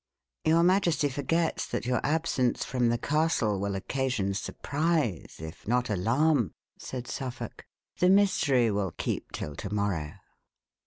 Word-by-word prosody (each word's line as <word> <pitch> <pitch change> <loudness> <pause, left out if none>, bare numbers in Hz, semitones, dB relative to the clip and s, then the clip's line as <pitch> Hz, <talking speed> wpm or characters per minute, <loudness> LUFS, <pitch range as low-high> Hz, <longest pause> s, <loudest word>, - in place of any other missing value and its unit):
"Your 165 +1 +5
majesty 175 -5 +3
forgets 160 +5 0
that - - -3
your 125 0 0
absence 145 -5 +1
from 125 -2 +1
the 120 - +2
castle 145 - +1
will 100 0 -2
occasion 115 -1 -1
surprise, 145 - -1
if 80 +3 -9
not 125 0 +1
alarm," 120 - +2 0.2
said 125 -2 -6
Suffolk. 130 -3 -6 0.3
"The 180 - +5
mystery 145 - +4
will 100 -4 -1
keep - - -3
till 75 - -5
to 100 - -5
morrow." 100 -8 -1
125 Hz, 135 wpm, -28 LUFS, 100-155 Hz, 0.3 s, Your